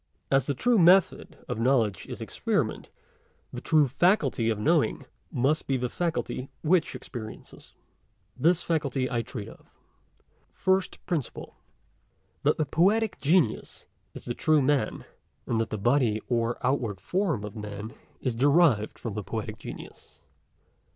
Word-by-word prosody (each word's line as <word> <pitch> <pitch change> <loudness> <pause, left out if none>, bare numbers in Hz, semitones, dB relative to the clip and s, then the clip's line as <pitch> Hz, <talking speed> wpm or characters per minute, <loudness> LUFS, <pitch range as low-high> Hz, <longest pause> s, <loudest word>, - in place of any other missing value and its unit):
As 135 0 +3
the 140 - 0
true 240 - +3
method 180 +2 +4
of - - -3
knowledge 115 -6 +1
is - - -7
experiment; - - -2 0.6
the - - -5
true 155 -3 +3
faculty 135 - +2
of 110 - 0
knowing 105 - +1 0.3
must 140 +6 +1
be 135 - +1
the 125 -1 -2
faculty 165 -5 -3
which 165 0 +2
experiences. 110 -5 -10 0.6
This 170 +2 +2
faculty 140 -5 -1
I 120 -2 0
treat 115 -3 -7
of. - - -15 0.8
PRINCIPLE 190 0 0
FIRST. 155 -9 -2 1.0
That - - +2
the 155 - +1
Poetic 200 +9 +2
Genius 150 -6 +1 0.3
is - - -8
the 120 - -3
true 155 +2 +2
Man, 135 -4 0 0.4
and 115 -1 0
that 110 - -3
the 110 - -3
body 120 0 +2
or 120 -1 0
outward 120 -7 0
form 170 - -1
of 105 -1 -7
Man 105 0 -7 0.3
is 130 - -1
derived 140 -3 +3
from 115 - -5
the 105 0 -4
Poetic - - -5
Genius. - - -11
135 Hz, 140 wpm, -27 LUFS, 115-165 Hz, 1.0 s, method